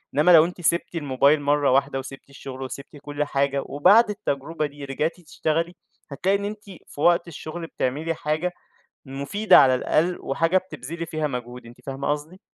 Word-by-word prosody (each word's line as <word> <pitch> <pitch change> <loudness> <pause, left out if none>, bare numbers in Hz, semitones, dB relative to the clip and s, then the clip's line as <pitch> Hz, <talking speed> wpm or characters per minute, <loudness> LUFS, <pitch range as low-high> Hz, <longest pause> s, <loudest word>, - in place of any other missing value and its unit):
إنما 150 +5 +5
لو 165 -2 +8
أنتِ 180 0 -7
سِبتِ 170 +2 0
الموبايل 145 0 +2
مرّة 145 -1 +2
واحدة 135 0 +2
وسِبتِ 135 +1 -10
الشغل 135 -1 -9
وسِبتِ 140 +3 -8
كُلّ 145 0 -2
حاجة، 140 -1 0
وبعد 205 +11 +5
التجربة 160 -6 -3
دي 145 -1 -8
رِجعتِ 155 +6 -2
تشتغلي، 165 +2 -2 0.4
هتلاقي 190 +8 +1
إن 200 - -4
أنتِ 210 0 -6 0.2
في 145 - -9
وقت 170 +1 +4
الشغل 165 +1 -7
بتعملي 155 +4 -2
حاجة 155 +4 -1 0.5
مفيدة 140 +11 +3
على 130 -2 +6
الأقل، 170 +7 +1
وحاجة 165 +7 +1
بتبذلي 170 -2 -7
فيها 155 -1 -2
مجهود، 125 -2 -6
أنتِ 120 +1 -14
فاهمة 135 +1 -3
قصدي؟ 150 +5 -4
150 Hz, 170 wpm, -24 LUFS, 140-170 Hz, 0.5 s, لو